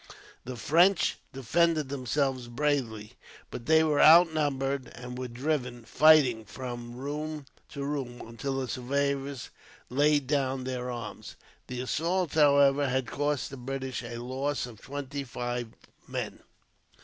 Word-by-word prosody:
The 130 0 -5
French 175 - +3
defended 155 +3 +1
themselves 135 -1 -1
bravely, 120 -5 -1 0.4
but 115 - -7
they 160 0 +6
were 150 -2 +2
outnumbered 145 -5 +4
and 125 0 -8
were 130 0 -4
driven, 125 -1 -3
fighting, 145 -6 +5
from 120 0 -7
room 150 +3 -5 0.2
to 140 - -6
room, 135 -4 -4
until 135 +4 -3
the 130 - -3
survivors 140 +1 -2 0.4
laid 145 +1 +3
down 135 -2 0
their 125 -1 -3
arms. 120 -3 -7 0.3
The 125 0 -4
assault, 170 +5 -1
however, 140 -2 +5
had 130 0 0
cost 145 +1 -2
the 135 - -7
British 130 -1 -4
a 120 -1 -7
loss 130 +3 -2
of 115 -4 -12
twenty 140 0 -5
five 120 -1 -4 0.4
men. - - -4
135 Hz, 130 wpm, -29 LUFS, 125-145 Hz, 0.4 s, they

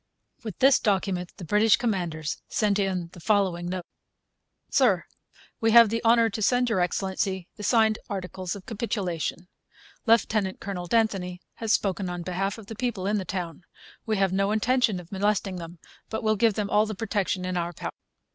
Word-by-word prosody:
With 215 -4 -6
this 270 0 +5
document 190 -4 0
the 180 - -8
British 210 +5 +4
commanders 175 -9 -2
sent 205 -2 +1
in 185 -3 -1
the - - -11
following 185 -3 +1
note: 180 -1 -4 0.9
SIR, 205 -10 +3 0.5
We 225 - +2
have 235 -2 +9
the 230 +1 -2
honour 230 0 +5
to 215 - -4
send 245 +3 +3
Your 215 - +2
Excellency 190 +1 -1
the - - -10
signed 220 0 +3
articles 185 -2 -4
of 195 - -10
Capitulation. 185 -6 -3 0.6
Lieutenant 215 -4 +2
Colonel 180 -3 -5
d'Anthony 195 -5 0 0.2
has 225 -2 0
spoken 190 -2 0
on 175 -1 -4
behalf 190 +3 -2
of 220 - -11
the 225 - -8
people 230 -5 -2
in 205 +1 +1
the 190 - -5
town. 175 -4 -4 0.5
We 215 -1 +1
have 195 -1 +2
no 195 +1 +1
intention 225 -2 +2
of 175 -1 -13
molesting 195 -1 0
them; 170 0 -8 0.3
but 220 - -3
shall 215 0 +3
give 220 0 +3
them 205 -2 -2
all 210 +1 +4
the 215 - -4
protection 200 -3 -1
in 185 0 -2
our 170 -1 -1
power. 175 - -6
195 Hz, 180 wpm, -26 LUFS, 180-220 Hz, 0.9 s, have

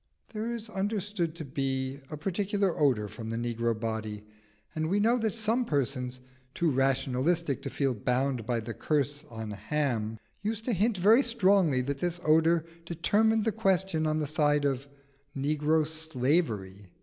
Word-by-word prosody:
There 220 +2 -2
is 230 -1 -4
understood 200 -4 -2
to 160 - -6
be 135 0 -2
a 150 - -5
peculiar 195 +2 0
odour 125 -8 +2
from 110 +2 -8
the 115 - -2
negro 115 -1 -1
body, 110 -2 -4 0.5
and 160 0 -1
we 200 +3 +2
know 230 +4 +3
that 220 -1 -1
some 230 +2 +1
persons, 130 - -2 0.3
too 170 -2 +2
rationalistic 135 +3 +1
to - - -4
feel 135 -3 0
bound 125 +2 0
by 120 -2 0
the 115 +1 -6
curse 145 +3 -1
on 110 -2 -6
Ham, 110 0 -1 0.2
used 220 +1 -3
to 245 - +1
hint 210 +3 +1
very 215 +8 +6
strongly 195 - +3
that 140 +2 -3
this 175 +1 -1
odour 160 +1 +4 0.2
determined 210 +7 +2
the 225 - +2
question 190 -6 +1
on 155 0 +1
the 155 - 0
side 145 -1 +2
of 135 0 -1 0.5
negro 150 +2 +2
slavery. 130 - -1
150 Hz, 160 wpm, -29 LUFS, 125-190 Hz, 0.5 s, very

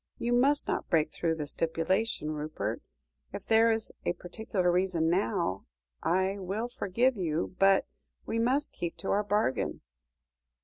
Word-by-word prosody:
You 240 +1 -1
must 275 +4 +4
not - - -2
break 160 -3 +2
through 165 -1 0
the 150 -2 -4
stipulation, 165 +3 0
Rupert. 150 -8 -3 0.5
If 195 - -6
there 225 +1 +5
is 225 -1 0
a - - 0
particular 180 0 -2
reason 175 -3 +1
now 175 - 0 0.3
I 190 +3 +1
will 200 +6 -3
forgive 240 +3 +1
you 170 0 -2
but 195 0 +5 0.4
we 225 - -1
must 265 +6 +1
keep 170 -1 -4
to - - -3
our 205 +1 +2
bargain." 205 -10 0
190 Hz, 145 wpm, -30 LUFS, 165-220 Hz, 0.5 s, there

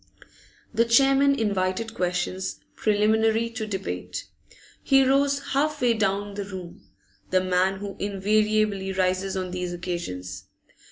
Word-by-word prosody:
The 230 +1 +4
chairman 275 +4 +4
invited 200 +1 -1
questions, 180 +1 -2 0.2
preliminary 220 +2 +2
to 225 -2 -4
debate. 195 -2 -4 0.6
He 270 -1 +5
rose 275 +1 +2
half 300 +2 +1
way 245 -2 +3
down 205 -1 -1
the 200 0 -4
room, 185 -3 -9 0.4
the 185 0 +2
man 185 +1 +2
who 200 0 -7
invariably 205 0 +1
rises 185 +1 0
on 185 -1 -3
these 180 -1 -3
occasions. 170 - -5
200 Hz, 120 wpm, -25 LUFS, 185-225 Hz, 0.6 s, He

